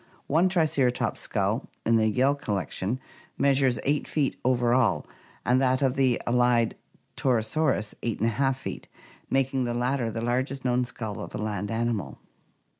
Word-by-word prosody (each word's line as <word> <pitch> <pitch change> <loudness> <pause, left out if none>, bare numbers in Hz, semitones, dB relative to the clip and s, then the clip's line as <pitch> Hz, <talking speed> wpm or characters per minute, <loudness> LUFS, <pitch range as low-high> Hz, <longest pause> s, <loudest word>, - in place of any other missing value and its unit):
One 165 +6 +3
Triceratops 155 -8 +1
skull - - -1 0.2
in 115 - +4
the 110 -1 +3
Yale 130 +6 +3
collection 105 -2 -2 0.4
measures 135 -3 +3
8 145 +1 +1
feet 145 -4 0
over 120 -1 +2
all, 110 - +2 0.4
and 125 +2 +3
that 130 +1 +2
of 130 -1 +2
the 130 -3 +2
allied 120 -1 +3 0.4
Torosaurus 125 -1 +1
8y£ 115 +4 0
feet, 135 - -7 0.4
making 135 -1 +1
the 120 0 -2
latter 125 0 0
the 115 0 -4
largest 130 +3 -1
known 125 0 +2
skull 110 -3 -6
of - - -7
a - - -2
land 105 -2 -3
animal. 115 -3 -2
125 Hz, 145 wpm, -26 LUFS, 115-135 Hz, 0.4 s, in